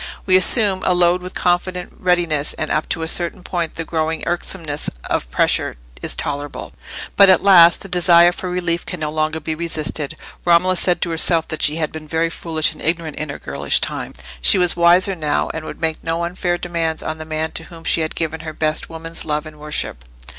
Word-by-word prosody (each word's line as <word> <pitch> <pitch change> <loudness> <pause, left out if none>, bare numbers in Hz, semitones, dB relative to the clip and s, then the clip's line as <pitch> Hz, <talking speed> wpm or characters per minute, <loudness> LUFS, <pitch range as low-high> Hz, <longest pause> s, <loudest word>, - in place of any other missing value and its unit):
We 185 - +4
assume 190 0 +4
a 180 - +2
load 175 0 +3
with 180 +1 -9
confident 180 0 -1
readiness, 170 -5 0
and 155 - -3
up 155 - -1
to 165 - -2
a - - -3
certain 175 +2 +1
point 170 -3 -3
the 165 - -4
growing 160 0 -2
irksomeness 170 -3 -1
of - - -2
pressure - - 0 0.2
is - - -1
tolerable; 145 0 -5 0.4
but 200 -1 +7
at 185 -1 +5
last 175 -4 +7
the - - -8
desire 175 -1 +5
for 180 +1 -6
relief 175 -1 -1
can 180 - -6
no 150 -1 -3
longer 155 +1 -1
be 160 +1 -3
resisted. 155 -3 -3 0.3
Romola 180 +2 +3
said 180 0 +1
to 170 - -2
herself 165 0 +2
that 160 - -4
she 150 - +2
had 160 -2 -2
been 155 -1 -9
very 165 +2 0
foolish 160 -1 -1
and - - -14
ignorant 165 -2 -2
in 155 - -4
her 145 - -5
girlish - - 0
time: - - -4 0.3
she 65 - +7
was 180 -1 +2
wiser 175 +3 +4
now, 155 -4 -1
and 160 -1 -6
would - - -8
make 160 -1 -2
no 165 +1 -2
unfair 175 0 -2
demands 165 -2 -3
on 155 0 -4
the - - -5
man 155 0 -3
to 165 - -5
whom 165 -1 -12
she 165 - +1
had 155 - -3
given 160 -1 -3
her 155 0 -7
best 155 0 -1
woman's 165 0 -6
love 150 0 -2
and 155 -1 -12
worship. 150 - -3
165 Hz, 210 wpm, -19 LUFS, 155-175 Hz, 0.4 s, but